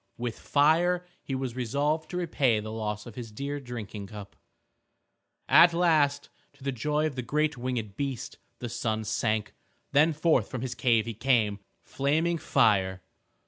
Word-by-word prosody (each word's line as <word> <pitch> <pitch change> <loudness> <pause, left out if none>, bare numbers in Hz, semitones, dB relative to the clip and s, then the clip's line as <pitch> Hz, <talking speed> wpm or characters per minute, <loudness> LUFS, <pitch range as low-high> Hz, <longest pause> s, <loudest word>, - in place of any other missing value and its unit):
With 120 -2 -4
fire 170 +5 +3 0.2
he 135 - -4
was 130 -2 -3
resolved 145 +6 -1
to 180 - -4
repay 140 -10 +1
the 110 +1 -6
loss 105 -1 -4
of 120 - -9
his 115 -1 -8
dear 140 +6 -4
drinking 110 -6 -7
cup. 105 -1 -10 1.1
At 170 0 +7
last, 150 -5 +2 0.2
to 140 -1 -18
the 135 - -1
joy 150 +5 0
of 155 - -1
the 130 - -3
great 150 +4 0
winged 120 -5 -3
beast, 135 -4 -4 0.2
the 120 - -5
sun 110 -2 -2
sank. 110 0 -1 0.4
Then 150 +3 +5
forth 155 -6 +2
from 130 - -5
his 130 -1 -3
cave 115 -3 +2
he 115 - -4
came, 110 -3 +1 0.2
flaming 160 +5 0
fire. 95 -10 +2
130 Hz, 160 wpm, -28 LUFS, 110-150 Hz, 1.1 s, At